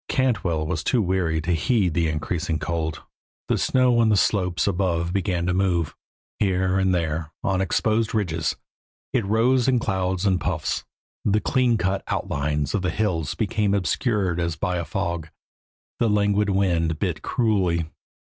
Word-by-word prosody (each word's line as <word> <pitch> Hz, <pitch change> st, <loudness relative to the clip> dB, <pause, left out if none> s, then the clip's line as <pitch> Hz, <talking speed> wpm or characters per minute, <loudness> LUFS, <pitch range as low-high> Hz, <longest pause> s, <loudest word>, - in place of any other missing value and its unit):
Cantwell 95 Hz, -12 st, +1 dB
was 75 Hz, 0 st, -2 dB
too 125 Hz, -, +2 dB
weary 90 Hz, -5 st, +1 dB
to 85 Hz, +3 st, -2 dB
heed 90 Hz, -, +1 dB
the 85 Hz, 0 st, +1 dB
increasing 80 Hz, +1 st, -2 dB
cold. 80 Hz, +1 st, -3 dB, 0.5 s
The -, -, +2 dB
snow 125 Hz, -2 st, +3 dB
on 115 Hz, -1 st, +4 dB
the 105 Hz, -, +4 dB
slopes 90 Hz, -3 st, +1 dB
above 85 Hz, -3 st, 0 dB
began 90 Hz, -3 st, 0 dB
to 90 Hz, -, +1 dB
move; 90 Hz, -5 st, 0 dB, 0.4 s
here 95 Hz, -1 st, +1 dB
and 95 Hz, -1 st, +2 dB
there, 80 Hz, -3 st, -1 dB
on 95 Hz, -1 st, +1 dB
exposed 110 Hz, +5 st, +1 dB
ridges, 85 Hz, -7 st, 0 dB, 0.6 s
it 125 Hz, -4 st, +2 dB
rose 115 Hz, +5 st, +2 dB
in 130 Hz, -1 st, +4 dB
clouds 95 Hz, -3 st, -1 dB
and 95 Hz, -2 st, +2 dB
puffs; 80 Hz, -4 st, -2 dB, 0.4 s
the 105 Hz, +1 st, +2 dB
cleancut 110 Hz, -7 st, +1 dB
outlines 75 Hz, 0 st, -1 dB
of 105 Hz, -, 0 dB
the 90 Hz, -, 0 dB
hills 85 Hz, -5 st, -1 dB
became 105 Hz, -2 st, 0 dB
obscured 100 Hz, -1 st, 0 dB
as 85 Hz, -1 st, -1 dB
by 90 Hz, +3 st, -1 dB
a 85 Hz, -, -3 dB
fog; 85 Hz, -5 st, -3 dB, 0.7 s
the 115 Hz, -, +2 dB
languid 105 Hz, 0 st, +2 dB
wind 85 Hz, -5 st, +1 dB
bit 85 Hz, -4 st, -2 dB
cruelly. 95 Hz, -9 st, +1 dB
95 Hz, 155 wpm, -24 LUFS, 85-105 Hz, 0.7 s, on